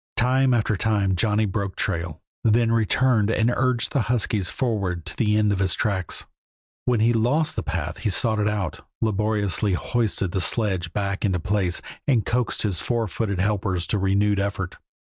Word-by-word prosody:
Time 130 +2 +3
after 110 -3 +1
time 100 -2 +1
Johnny 110 +2 +2
broke 100 -1 -3
trail, 85 -1 -2 0.2
then 115 +1 +3
returned 115 0 +2
and 115 +2 +2
urged 130 -2 +1
the 140 - +1
huskies 105 -6 +1
forward 100 -9 -2
to - - -5
the 105 -2 +2
end 105 -1 +3
of 100 - -1
his 95 -2 +2
tracks. 95 -5 -1 0.6
When 120 -3 +2
he 115 +2 +4
lost 125 +8 +1
the - - -1
path 80 +1 -4
he 110 - -1
sought 105 +3 +1
it 105 0 +2
out, 100 -7 -3 0.2
laboriously 105 -2 0
hoisted 105 -2 -1
the 95 - -1
sledge 95 -4 0
back 100 0 -2
into 95 -4 +1
place, 95 -1 0 0.2
and 120 -8 +2
coaxed 120 -1 0
his 100 -6 0
four 120 -2 -1
footed 100 +1 -2
helpers 95 -3 0
to 105 - +1
renewed 100 +1 +2
effort. 95 -2 -3
105 Hz, 175 wpm, -24 LUFS, 95-115 Hz, 0.6 s, he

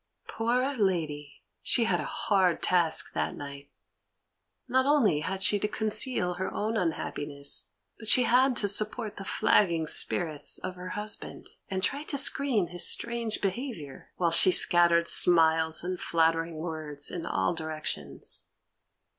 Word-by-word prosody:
Poor 250 +5 -1
lady, 155 -7 -3 0.2
she 240 - +4
had 180 -6 0
a 150 - -4
hard 185 -1 0
task 170 -3 +3
that - - -3
night. 140 0 -10 1.0
Not 260 +2 +1
only 260 - +2
had 190 +5 -2
she 205 - +5
to 210 - -1
conceal 215 -3 +1
her 185 +2 -5
own 220 +2 -3
unhappiness, 145 -6 -3 0.3
but 220 - -9
she 250 - +4
had 255 +2 +2
to 210 - 0
support 215 +2 +1
the 200 - -7
flagging 170 -4 +1
spirits 155 0 +1
of 185 - -7
her 180 0 -9
husband, 210 0 -7 0.2
and 190 -1 -4
try 280 +6 -1
to 295 -1 -3
screen 265 -9 +2
his 175 0 +4
strange 235 -2 -2
behaviour, 195 - -6
while 170 -2 0
she 170 - +6
scattered 170 -1 +4
smiles 160 -2 +2
and 180 0 -4
flattering 165 0 0
words 155 -3 -5
in 170 -1 -6
all 95 - -1
directions. 155 - -5
180 Hz, 145 wpm, -27 LUFS, 160-220 Hz, 1.0 s, she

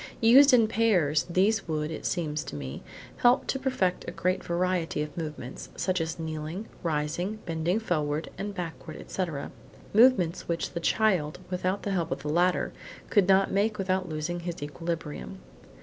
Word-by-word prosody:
Used 265 +5 +8
in 235 -3 +6
pairs, 185 -11 +2
these 195 +4 +2
would, 155 -1 -2
it 160 - -4
seems 155 -4 -1
to - - -7
me, 70 -2 -6 0.4
help 245 +2 +4
to 270 - -1
perfect 255 -9 0
a - - -3
great 185 +1 -1
variety 175 -3 0
of 150 -1 -8
movements, 150 -6 -6
such 180 0 0
as 160 0 -3
kneeling, 160 +4 -4 0.2
rising, 165 +4 -1
bending 165 +4 0
forward 155 -7 -1
and 205 +1 -4
backward, 165 -3 -6
etc.; 165 -7 -4 0.4
movements 215 -7 +4
which 170 -1 -2
the 170 - -3
child, 175 -5 +1
without 185 +2 -1
the 200 - -2
help 170 -4 0
of - - -4
the 150 - -3
ladder, 175 +4 +2 0.4
could 205 -4 +4
not 195 0 +4
make 210 +2 +1
without 185 -2 -1
losing 155 +3 -3
his 170 -3 -5
equilibrium. 165 +3 -5
175 Hz, 165 wpm, -28 LUFS, 155-195 Hz, 0.4 s, Used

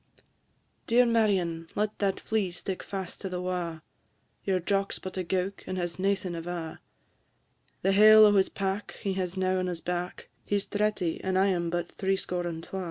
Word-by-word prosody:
"Dear 245 +2 +5
Marion, 190 -8 +1
let 210 +1 -1
that 195 -2 +1
flee 215 -4 0
stick 180 +2 -5
fast 190 -3 -6
to 195 - -3
the 180 -1 -3
wa'; 175 -3 -3 0.6
Your 190 -2 +1
Jock 195 +2 0
's - - -3
but 185 - -7
a 185 - -1
gowk, 185 +3 -2
and 185 - -3
has 175 0 -3
naething 195 -1 0
ava; 170 -1 -5 1.0
The 195 - +3
hale 215 +2 +9
o' 210 - +6
his 195 -2 +4
pack 195 +1 -3
he 195 - 0
has 185 -1 -3
now 185 0 +1
on 185 - -1
his 175 -2 -3
back 180 +2 -4
He 205 - -1
's 200 - -3
thretty, 205 -5 -1
and 190 0 0
I 195 +1 +4
am 170 -3 0
but 175 0 -2
threescore 190 -2 -1
and 165 -1 -5
twa. 190 - -5
185 Hz, 190 wpm, -28 LUFS, 175-200 Hz, 1.0 s, hale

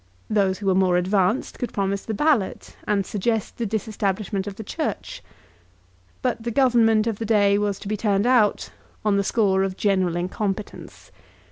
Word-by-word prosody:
Those 195 -3 +2
who 205 - -8
were 190 - +3
more 185 -1 +3
advanced 190 +5 0
could 245 - -3
promise 195 0 -1
the 220 - -3
Ballot, 275 -6 0
and 200 -2 +1
suggest 215 +2 -2
the 230 - -1
disestablishment 205 -2 -2
of 200 - -5
the 220 - -7
Church. - - -4 1.0
But - - -1
the 235 - -3
Government 230 -3 +3
of 225 -3 -2
the - - -2
day 205 -2 +3
was 205 -1 -1
to - - -8
be 215 - -1
turned 205 -1 +1
out 240 -5 +2 0.3
on 205 -1 +3
the 200 - +2
score 195 -2 +2
of 190 -1 -2
general 190 -4 +1
incompetence. 195 +3 -4
205 Hz, 170 wpm, -23 LUFS, 195-220 Hz, 1.0 s, were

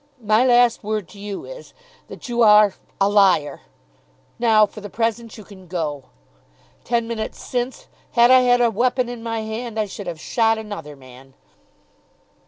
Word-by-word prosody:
My 215 +1 +2
last 245 -2 +3
word 210 -3 -3
to 200 - -14
you 200 -1 -7
is, - - -12 0.3
that - - -10
you 240 -1 -1
are 210 -2 +6 0.3
a 195 - +3
liar. 195 -7 +2 0.8
Now 220 -3 +4
for 210 - -12
the 205 - -8
present 230 0 -3
you 215 - -11
can 190 -2 -15
go. 155 -5 -4 0.8
Ten 235 -1 -1
minutes 230 -2 -5
since, 250 +1 -4 0.3
had 240 +1 +5
I 255 - +8
had 245 -1 +3
a 235 -1 +3
weapon 250 +3 0
in 240 -1 -7
my 225 -1 -3
hand 220 +1 -5
I 215 - +1
should 200 0 -9
have 170 -2 -6
shot 225 +5 +1
another 205 -9 -8
man." 130 0 -16
220 Hz, 170 wpm, -21 LUFS, 200-235 Hz, 0.8 s, I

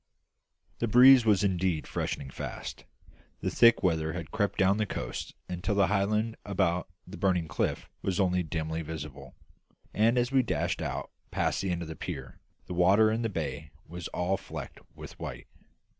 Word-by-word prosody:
The 115 - 0
breeze 125 +2 +8
was 105 -2 +4
indeed 90 -4 0
freshening 65 -1 -3
fast; - - -7 0.6
the - - -1
thick 115 -2 +5
weather 80 -3 +1
had 85 -3 -6
crept 100 -3 0
down 95 +1 +4
the 110 -1 0
coast - - -5
until 90 +2 -2
the 100 -1 +4
high 100 -1 +3
land 110 +2 -1
about 90 -3 0 0.2
the 95 - -9
Burning 90 -4 +1
Cliff - - -2
was 95 -1 -1
only 90 -2 +2
dimly 80 0 -3
visible; 75 -4 -8 0.6
and 115 +3 +3
as 120 +1 +1
we 135 -1 +5
dashed 120 - -1
out - - -4 0.2
past - - 0
the 95 - -2
end 85 -1 -1
of - - -7
the 80 - -6
pier, 70 -9 -7 0.3
the - - -6
water 100 +5 +5
in 115 +1 -1
the 115 - 0
bay 75 -5 -4 0.2
was 85 0 -6
all 90 +2 -1
flecked - - -8 0.2
with - - -11
white. - - -6
90 Hz, 175 wpm, -29 LUFS, 80-105 Hz, 0.6 s, breeze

